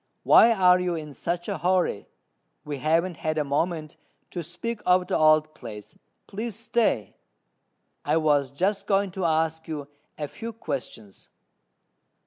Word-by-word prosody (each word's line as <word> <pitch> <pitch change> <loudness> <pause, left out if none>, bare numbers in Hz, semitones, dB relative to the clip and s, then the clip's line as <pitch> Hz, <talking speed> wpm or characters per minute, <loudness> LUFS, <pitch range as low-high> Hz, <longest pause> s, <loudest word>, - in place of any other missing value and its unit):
why 230 - +7
are 180 -4 +5
you 180 -1 -1
in 150 -2 -7
such 175 +4 -3
a - - -3
hurry; 180 - +1 0.6
we 145 -1 -4
haven't 165 +5 +1
had 155 0 -2
a 150 - +2
moment 155 +2 -2 0.3
to 175 - -4
speak 205 +8 -5
of 180 0 +3
the 190 - -1
old 155 0 +4
place. 110 -7 -10 0.3
Please 220 +1 -5
stay: 225 - 0 0.9
I - - +1
was 145 -4 +2
just 190 +9 -1
going 195 -1 +2
to 185 0 -3
ask 160 0 0
you 150 -3 -5 0.3
a 150 - -3
few 225 +9 -7
questions." 130 - -7
165 Hz, 145 wpm, -26 LUFS, 150-185 Hz, 0.9 s, why